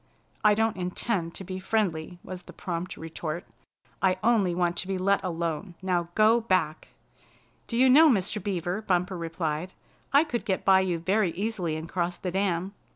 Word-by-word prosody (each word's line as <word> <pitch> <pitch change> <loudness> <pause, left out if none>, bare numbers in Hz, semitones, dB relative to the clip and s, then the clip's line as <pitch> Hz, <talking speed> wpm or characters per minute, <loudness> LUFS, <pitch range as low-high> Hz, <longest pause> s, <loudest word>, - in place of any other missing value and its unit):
"I 210 -1 +6
don't 225 -1 +1
intend 180 -1 -2
to - - -6
be 185 0 -5
friendly," 180 -5 -1
was 185 -1 -7
the - - -13
prompt 175 +1 -4
retort. 160 +1 -5 0.6
"I 185 -1 +3
only 210 -7 +3
want 175 -1 +1
to 185 - -1
be 195 -1 -1
let 200 +2 +2
alone. 170 0 -3
Now 180 -2 0
go 220 +2 +5
back!" 165 -6 +1 0.8
"Do 230 - -3
you 260 +2 +6
know, 305 +5 +8
Mr. 205 -3 0
Beaver," 185 0 -2
Bumper 185 -2 0
replied, 165 0 -3 0.4
"I 280 +2 +6
could 240 - -3
get 190 -2 -2
by 190 -1 +6
you 185 -2 0
very 190 +3 +1
easily 190 -5 -2
and 160 +1 -5
cross 175 0 -2
the 180 - -4
dam? 190 0 -1
185 Hz, 175 wpm, -27 LUFS, 170-205 Hz, 0.8 s, know